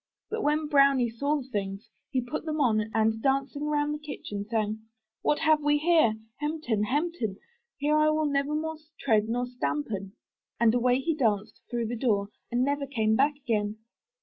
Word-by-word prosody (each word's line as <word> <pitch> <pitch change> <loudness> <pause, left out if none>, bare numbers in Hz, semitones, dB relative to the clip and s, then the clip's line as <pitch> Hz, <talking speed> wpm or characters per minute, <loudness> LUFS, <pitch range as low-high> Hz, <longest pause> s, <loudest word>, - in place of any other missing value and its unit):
But 445 0 -1
when 300 -1 +1
BROWNIE 275 -5 +4
saw 285 +6 0
the - - -17
things, 200 -2 -4 0.2
he 260 -3 0
put 245 +4 -4
them 310 -1 -2
on 220 -5 +2
and, 220 0 +1
dancing 275 +2 0
round 295 0 +1
the 300 - -4
kitchen, 210 -9 -6
sang, 215 -1 0 0.4
'What 295 - +2
have 310 -1 +3
we 295 0 +3
here? 310 -8 +4 0.2
Hem 300 +2 -2
ten 225 -8 0
ham 295 +9 0
ten! 220 - -3 0.4
Here 295 +2 +2 0.2
will 310 0 +1
I - - -1
nevermore 300 +3 -1 0.2
tread 220 -4 +2
nor 245 +2 0
stampen.' 195 - -3 0.5
And 230 -1 +5
away 245 +1 +3
he 325 +4 0
danced 215 -8 0
through 240 -1 -1
the 235 +2 -3
door 210 -5 +1 0.2
and 245 +1 +2
never 285 +1 0
came 220 -5 +1
back 285 +4 +3
again." 215 -6 -1
255 Hz, 180 wpm, -28 LUFS, 220-295 Hz, 0.5 s, And